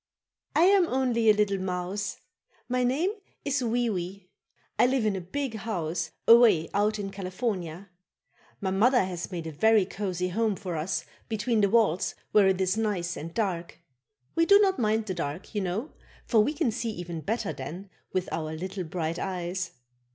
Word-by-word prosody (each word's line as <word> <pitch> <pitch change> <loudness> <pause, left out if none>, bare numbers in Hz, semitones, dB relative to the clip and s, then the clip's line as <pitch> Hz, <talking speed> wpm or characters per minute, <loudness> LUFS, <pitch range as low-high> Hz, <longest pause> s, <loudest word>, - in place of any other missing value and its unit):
I 325 - +5
am 380 -1 +5
only 245 -5 +2
a - - +8
little 200 -2 +1
mouse; 185 +2 -3 0.5
my 250 0 +1
name 285 +10 +1 0.3
is 280 -1 +1
Wee 240 0 +1
Wee. 185 -2 -4 0.5
I - - +6
live 255 -3 +1
in 210 -2 +1
a 190 - -3
big 225 +6 -3
house 170 -6 -2 0.2
away 225 -9 +7
out 210 +2 +2
in 200 -1 -4
California. 185 -2 -4 0.7
My 190 -1 -1
mother 235 +5 +4
has 180 0 -5
made 170 -3 -4
a 160 - -4
very 215 +6 +4
cozy 180 -2 -3
home 215 +2 +1
for 180 -3 -5
us 160 +4 -2 0.2
between 225 0 +1
the 200 - +4
walls 210 -6 +2 0.2
where 205 -2 +6
it 190 -1 +2
is 190 +2 +1
nice 190 -6 -1
and 165 +2 -6
dark. 175 -5 -2 0.6
We 330 0 +2
do 400 - +8
not 390 -2 +3
mind 220 -1 +1
the 190 - -2
dark, 170 +3 -5
you 205 - 0
know, 195 - -3 0.3
for 225 - +3
we 285 +9 +2
can 285 -7 +1
see 230 +1 -3
even 175 -5 -5
better 215 -2 -2
then, 160 +9 -7 0.2
with 185 -1 -1
our 155 -1 -3
little 185 +3 -4
bright 165 0 -3
eyes. 180 -1 -3
200 Hz, 180 wpm, -28 LUFS, 180-230 Hz, 0.7 s, a